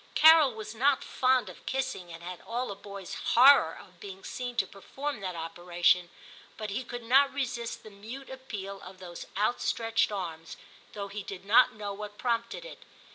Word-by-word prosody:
Carol 315 Hz, -6 st, +7 dB
was 215 Hz, 0 st, -7 dB
not 265 Hz, +4 st, +2 dB
fond 255 Hz, -3 st, +2 dB
of 185 Hz, -, -11 dB
kissing, 260 Hz, -10 st, -2 dB
and 165 Hz, 0 st, -10 dB
had 180 Hz, 0 st, -7 dB
all 240 Hz, 0 st, -3 dB
a -, -, -5 dB
boy*s 200 Hz, -1 st, -9 dB, 0.2 s
horror 250 Hz, -, +7 dB
of 180 Hz, -1 st, -16 dB
being 195 Hz, 0 st, -9 dB
seen 245 Hz, -1 st, -5 dB
to 195 Hz, -, +2 dB
perform 265 Hz, +8 st, -6 dB
that 185 Hz, -3 st, -4 dB
opera 175 Hz, +1 st, -7 dB
tion, 175 Hz, 0 st, +5 dB, 0.5 s
but 215 Hz, -2 st, -4 dB
he 235 Hz, +6 st, -2 dB
could 245 Hz, 0 st, -7 dB
not 270 Hz, +4 st, +5 dB
resist 250 Hz, -4 st, -3 dB
the 215 Hz, -, -11 dB
mute 225 Hz, +7 st, -9 dB
appeal 205 Hz, -7 st, -7 dB
of 185 Hz, +1 st, -11 dB
those 175 Hz, -2 st, -9 dB
outstretched 225 Hz, +1 st, +1 dB
arms, 165 Hz, -5 st, -5 dB, 0.4 s
though 200 Hz, -1 st, -5 dB
he 205 Hz, +1 st, -5 dB
did 195 Hz, -1 st, -8 dB
not 225 Hz, +5 st, +6 dB
know 205 Hz, -2 st, -4 dB
what 205 Hz, 0 st, -8 dB
prompted 235 Hz, -, -2 dB
it. -, -, -10 dB
210 Hz, 185 wpm, -29 LUFS, 190-250 Hz, 0.5 s, Carol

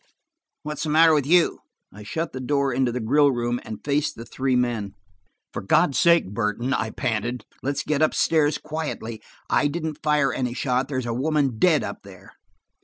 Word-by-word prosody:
What's 150 Hz, -1 st, -5 dB
the 155 Hz, -, -2 dB
matter 160 Hz, +1 st, +6 dB
with 145 Hz, -3 st, +1 dB
you?" 175 Hz, +1 st, +3 dB, 0.3 s
I 105 Hz, -, -11 dB
shut 160 Hz, +10 st, -4 dB
the 130 Hz, -, -5 dB
door 140 Hz, 0 st, 0 dB
into 130 Hz, -1 st, +1 dB
the 125 Hz, -, -3 dB
grill 140 Hz, +5 st, +3 dB
room 120 Hz, -1 st, -1 dB
and 110 Hz, -, -9 dB
faced 145 Hz, +1 st, 0 dB
the 115 Hz, -, -9 dB
three 130 Hz, 0 st, -1 dB
men. 115 Hz, -5 st, -1 dB, 0.6 s
"For -, -, -4 dB
God's 140 Hz, -, +2 dB
sake, 170 Hz, -, +4 dB
Burton," 115 Hz, +4 st, -1 dB
I 110 Hz, -3 st, -1 dB
panted, 120 Hz, 0 st, -3 dB, 0.2 s
"let's 140 Hz, +2 st, -2 dB
get 150 Hz, -1 st, -1 dB
up 155 Hz, -, +2 dB
stairs 155 Hz, -2 st, +2 dB
quietly. 150 Hz, -8 st, -5 dB, 0.3 s
I 145 Hz, -, +2 dB
didn't 155 Hz, 0 st, -4 dB
fire 150 Hz, -3 st, +2 dB
any 125 Hz, -2 st, -2 dB
shot. 130 Hz, -1 st, 0 dB
There's 130 Hz, -3 st, -3 dB
a 115 Hz, -, -2 dB
woman 135 Hz, -2 st, 0 dB
dead 165 Hz, -5 st, +4 dB
up -, -, -5 dB
there." 95 Hz, -1 st, -14 dB
135 Hz, 185 wpm, -24 LUFS, 120-150 Hz, 0.6 s, matter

